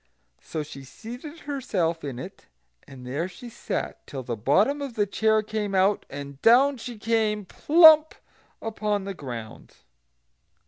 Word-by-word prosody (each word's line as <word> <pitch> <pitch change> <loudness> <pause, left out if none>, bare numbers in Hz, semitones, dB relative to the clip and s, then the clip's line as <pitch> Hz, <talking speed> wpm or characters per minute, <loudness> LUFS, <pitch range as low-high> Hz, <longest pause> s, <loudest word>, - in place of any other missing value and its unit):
So 155 -2 -4
she 140 -2 -10
seated 245 - -10
herself 190 - -2
in 135 -4 -5
it, 130 - -10 0.4
and 130 -2 -12
there 145 +8 -2
she 190 +7 -11
sat 235 - -5
till 135 -2 -6
the 120 -1 -3
bottom 200 - +2
of 275 -5 -5
the 210 -3 +2
chair 220 +1 +2
came 210 -2 -3
out, 190 +2 +2
and 140 0 -8
down 265 +4 +5
she 240 0 -8
came, 215 -2 0
plump 315 - +6 0.5
upon 210 -2 -2
the 195 0 -5
ground. 120 -9 -8
210 Hz, 145 wpm, -25 LUFS, 145-240 Hz, 0.5 s, plump